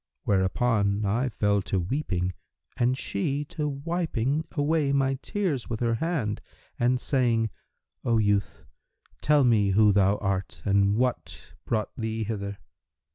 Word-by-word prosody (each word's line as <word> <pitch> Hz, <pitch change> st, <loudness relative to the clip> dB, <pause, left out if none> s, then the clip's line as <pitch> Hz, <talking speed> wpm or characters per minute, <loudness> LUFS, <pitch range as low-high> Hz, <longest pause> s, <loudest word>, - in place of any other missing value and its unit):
Whereupon 100 Hz, +1 st, +1 dB
I 120 Hz, +6 st, +1 dB
fell 105 Hz, -3 st, +1 dB
to 95 Hz, 0 st, -1 dB
weeping, 90 Hz, -, -1 dB, 0.4 s
and 125 Hz, 0 st, +1 dB
she 140 Hz, +7 st, -2 dB
to 150 Hz, -2 st, -2 dB
wiping 145 Hz, -2 st, -1 dB
away 150 Hz, -1 st, +1 dB
my 135 Hz, -1 st, +1 dB
tears 185 Hz, -, -2 dB
with 115 Hz, -2 st, -3 dB
her 115 Hz, -1 st, +1 dB
hand 150 Hz, -12 st, -1 dB, 0.4 s
and 125 Hz, +1 st, +2 dB
saying, 120 Hz, -5 st, +1 dB, 0.5 s
'O 115 Hz, -1 st, +2 dB
youth, 100 Hz, -6 st, 0 dB, 0.6 s
tell 150 Hz, -1 st, +4 dB
me 110 Hz, -5 st, +3 dB
who 105 Hz, +1 st, +5 dB
thou 100 Hz, 0 st, +3 dB
art, 95 Hz, -1 st, -3 dB
and 100 Hz, 0 st, +3 dB
what 125 Hz, +2 st, -2 dB
brought 110 Hz, -3 st, -2 dB
thee 110 Hz, -1 st, -3 dB
hither.' 100 Hz, -2 st, -4 dB
115 Hz, 130 wpm, -27 LUFS, 100-135 Hz, 0.6 s, who